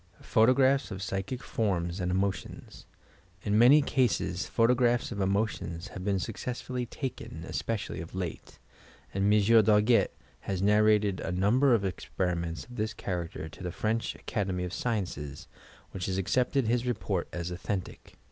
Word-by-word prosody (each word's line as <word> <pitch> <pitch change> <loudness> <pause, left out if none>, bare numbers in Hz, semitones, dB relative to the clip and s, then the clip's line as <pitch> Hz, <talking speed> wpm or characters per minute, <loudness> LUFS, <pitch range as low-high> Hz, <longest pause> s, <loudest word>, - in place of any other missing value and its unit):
PHOTOGRAPHS 130 +3 +3
OP 95 - -5
PSYCHIC 100 +6 -4
FORMS 90 -5 -1
AND 90 -1 -1
EMOTIONS 95 +1 -3 0.6
In 105 -1 0
many 130 +7 +7
cases 120 -9 0
photographs 120 +1 +2
of 100 -3 -3
emotions 95 -2 -1
have 95 - -7
been 100 0 +1
suc 95 - -4
cessfully 125 -1 -4
taken, 115 - -6
especially 110 -8 -3
of 85 +2 -9
late, 90 -3 -5 0.6
and 95 +1 +1
Monsieur 105 +2 +6
Darget 105 +1 +4 0.3
has 95 -2 -3
narrated 105 -1 +3
a 95 - -3
number 120 +9 +4
of 100 -3 0
experiments 85 -3 -2
of 120 - -12
this 110 +1 -2
character 85 -5 -4
to - - -13
the 90 -2 -3
French 110 +4 -1
Academy 95 -5 -2
o£ 90 - -6
Sciences, 90 - -3 0.4
which 90 - -4
has 95 -1 -1
accepted 125 +7 +1
his 120 +2 +1
report 105 -6 -1
as 85 0 -4
authentic. 90 +1 -5
100 Hz, 145 wpm, -29 LUFS, 90-115 Hz, 0.6 s, many